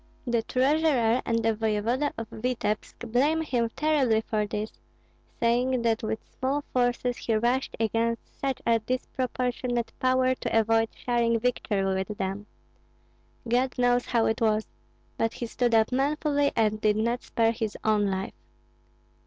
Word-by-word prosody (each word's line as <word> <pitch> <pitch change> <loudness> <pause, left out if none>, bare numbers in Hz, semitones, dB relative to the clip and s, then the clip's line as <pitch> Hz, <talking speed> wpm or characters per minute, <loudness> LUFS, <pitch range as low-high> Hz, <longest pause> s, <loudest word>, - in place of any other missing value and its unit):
The 240 -2 +1
treasurer 255 -2 +2
and 230 -1 +1
the 225 - +3
voevoda 225 +6 0
of 225 - -5
Vityebsk 225 -1 -3
blame 295 +7 +2
him 240 -6 0
terribly 275 -8 +2
for 215 -1 -1
this, 210 +1 -3 0.7
saying 245 +1 +2
that 225 -1 +1
with 220 0 -2
small 275 +3 -2
forces 245 0 +1
he 225 - -1
rushed 240 +4 0
against 230 +1 -1
such 270 -2 -2
a 230 -1 +3
disproportionate 250 0 -2
power 255 0 +3
to 225 - 0
avoid 225 0 +2
sharing 235 -1 +1
victory 220 -4 0
with 190 +2 -2
them. 195 +2 -3 1.0
God 250 +3 +1
knows 245 0 +2
how 230 -2 +2
it 220 - 0
was! 215 -1 +2 0.5
But 225 0 +1
he 240 - -4
stood 235 0 +1
up 220 +1 +3
manfully 285 +2 +1
and 215 -1 +1
did 215 -1 +3
not 235 +3 0
spare 225 -1 +1
his 220 -2 -3
own 210 -2 +2
life. 190 0 -3
235 Hz, 145 wpm, -27 LUFS, 220-255 Hz, 1.0 s, the